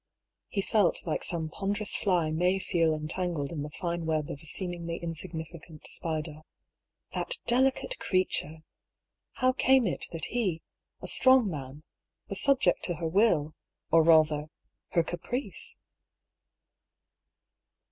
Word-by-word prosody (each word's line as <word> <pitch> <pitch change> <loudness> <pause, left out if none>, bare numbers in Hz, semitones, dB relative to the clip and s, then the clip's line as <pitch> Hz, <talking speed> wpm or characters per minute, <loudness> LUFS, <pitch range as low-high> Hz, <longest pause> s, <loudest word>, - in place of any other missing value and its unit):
" - - -60
He 195 - -2
felt 205 -5 +1
like 160 - -2
some 165 -2 -1
ponderous 205 +5 -1
fly 175 -6 +1
may 180 +4 +2
feel 170 -4 +1
entangled 155 -1 -2
in 160 -4 -4
the 150 - -5
fine 170 +1 -3
web 155 -2 -1
of 145 - -7
a 160 - -8
seemingly 170 -1 -3
insignificant 165 -1 -6
spider. 155 -1 -3 0.7
That - - -1
delicate 265 - +2
creature! 160 -4 -1 0.7
How 255 0 +2
came 260 -1 +4
it 185 - -2
that 165 -2 -2
he, 190 -10 -1 0.4
a - - -4
strong 260 -3 +5
man, 140 0 -7 0.5
was - - +1
subject 275 -2 +3
to 175 - -2
her 165 0 -3
will, 160 -5 +2 0.4
or 165 - +7
rather, 155 -2 +4 0.4
her 170 - +4
caprice 245 - -1
170 Hz, 130 wpm, -29 LUFS, 155-195 Hz, 0.7 s, or